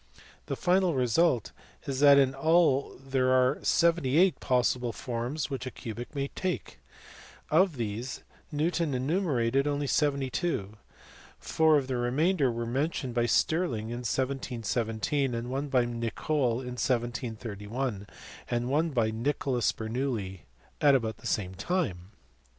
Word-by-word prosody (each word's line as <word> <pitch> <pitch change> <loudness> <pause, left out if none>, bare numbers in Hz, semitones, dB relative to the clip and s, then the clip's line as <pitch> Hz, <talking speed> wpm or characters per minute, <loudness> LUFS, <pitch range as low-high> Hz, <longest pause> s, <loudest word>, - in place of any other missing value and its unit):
The - - -2
final 180 -2 +2
result 125 0 +2 0.3
is 135 -2 -3
that 140 -1 +7
in 135 -1 +4
all 155 -1 +2
there 135 -1 0
are 130 0 +3
seventy 165 -5 +2
eight 185 +1 +4
possible 125 -1 +1
forms 125 +7 -4
which 130 -1 -4
a - - -2
cubic 120 +2 -8
may 140 0 -2
take. 185 -1 -4 0.7
Of 170 +1 +4
these 115 +3 -4 0.3
Newton 160 -1 0
enumerated 135 -3 +1
only 145 0 -1
seventy 140 -2 +1
two; 110 - -2 0.6
four 160 -1 +3
of 140 - 0
the 130 -1 -2
re 120 0 0
mainder 150 0 +2
were 115 0 -3
mentioned 130 +1 -2
by 120 0 +1
Stirling 120 -4 +1
in 120 - -4
1717, 120 0 -1
one 135 +3 -2
by 130 -3 +2
Nicole 120 +2 -1
in 125 -1 -6
1731, 115 -2 -3 0.4
and 120 +1 -1
one 155 +4 +2
by 115 -6 +1
Nicholas 125 +1 0
Bernoulli 110 - -4 0.4
about 125 -7 +3
the - - -8
same 95 -3 -1
time. 100 - -2
130 Hz, 135 wpm, -29 LUFS, 120-145 Hz, 0.7 s, that